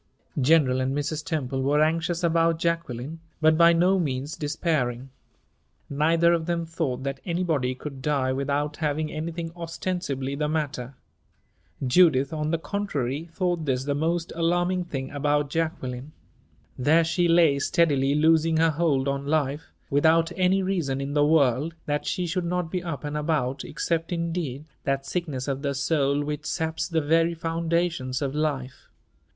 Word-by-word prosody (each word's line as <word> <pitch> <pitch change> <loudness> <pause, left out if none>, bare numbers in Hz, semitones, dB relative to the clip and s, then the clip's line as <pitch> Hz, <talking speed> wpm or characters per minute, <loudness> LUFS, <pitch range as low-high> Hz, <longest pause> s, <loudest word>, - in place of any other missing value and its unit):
General 130 -2 +4
and 135 +2 -1
Mrs. 150 +1 -2
Temple 135 -6 -2
were 145 +3 +2
anxious 165 +2 0
about 165 0 +3
Jacqueline, 165 -3 -2 0.2
but 155 0 +4
by 170 +1 +6
no 180 +3 +3
means 140 -2 -2
despairing. 140 -5 -2 0.8
Neither 165 +4 +3
of 165 -1 -1
them 170 -1 -1
thought 155 -6 -3
that 135 0 -3
anybody 165 -8 -1
could 135 0 -8
die 130 -2 0
without 145 +2 -1
having 155 0 -1
anything 165 +1 -4
ostensibly 165 -5 -3
the 150 +1 -1
matter. 140 -5 -3 0.9
Judith, 140 -1 +4
on 150 -1 -2
the 165 - +1
contrary, 160 -6 -3
thought 175 -2 -1
this 130 -2 0
the 145 +1 -1
most 165 +3 -1
alarming 175 +2 +1
thing 135 -5 -5
about 145 0 0
Jacqueline. 145 -4 -3 0.7
There 155 +6 +4
she 175 +2 +1
lay, 165 -4 +4
steadily 140 -3 +2
losing 160 +1 +3
her 165 0 +4
hold 145 -4 +1
on 140 0 -2
life, 150 0 -1 0.2
without 160 +4 +3
any 190 +1 +2
reason 170 -9 -1
in 140 +1 -3
the 145 0 +3
world 150 0 +2
that 145 0 -2
she 180 - -1
should 175 +1 -2
not 175 -1 -2
be 180 - -1
up 165 -7 -5
and 145 0 -4
about 145 -4 -1
except, 165 0 -2
indeed, 165 -5 -3 0.2
that 135 0 -1
sickness 150 -8 -3
of 135 -1 -2
the 140 -1 -1
soul 140 0 +1
which 150 +1 -4
saps 160 0 -2
the 165 -2 0
very 165 +3 +2
foundations 165 -5 -1
of 135 -1 -2
life. 145 -4 -3
155 Hz, 155 wpm, -25 LUFS, 140-165 Hz, 0.9 s, by